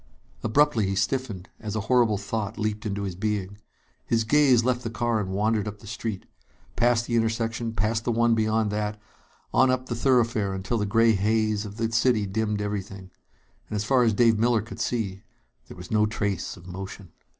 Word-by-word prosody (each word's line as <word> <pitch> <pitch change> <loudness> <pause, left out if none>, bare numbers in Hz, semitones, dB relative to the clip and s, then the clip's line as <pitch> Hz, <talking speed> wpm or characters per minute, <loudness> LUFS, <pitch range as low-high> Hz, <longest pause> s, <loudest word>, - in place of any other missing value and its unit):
Abruptly 115 -3 +3
he 95 - -1
stiffened, 100 -2 -2
as 105 -1 -5
a 110 - 0
horrible 115 -1 +3
thought 105 +1 -4
leaped 110 0 -2
into 100 0 -3
his 95 -2 -3
being. 100 0 -3 0.4
His 115 -1 +1
gaze 130 -1 +4
left 125 -1 +1
the 115 - -4
car 115 0 0
and 100 -3 -3
wandered 105 +2 0
up 105 0 -6
the 110 - -16
street. 110 -2 -5 0.5
Past 120 0 +2
the 120 - -1
intersection, 115 0 -1
past 110 +1 0
the 120 - 0
one 115 0 +3
beyond 110 -1 +1
that, 105 0 -2 0.5
on 130 - +5
up 130 0 0
the 120 - -1
thoroughfare 115 -5 +2
until 95 +5 -2
the 105 - -1
gray 115 +2 +4
haze 110 +1 +1
of 105 0 -9
the 115 0 -1
city 115 -2 +2
dimmed 105 +1 -1
everything. 100 -2 -5 0.6
And - - -4
as 105 - -1
far 130 +3 +3
as 115 -2 +4
Dave 115 -1 +4
Miller 115 -2 +2
could 115 0 -10
see, 110 -6 -2 0.5
there - - -11
was 90 0 -10
no 105 -1 +3
trace 105 -3 -3
of 85 - -14
motion. 95 0 -8
110 Hz, 195 wpm, -26 LUFS, 100-115 Hz, 0.6 s, on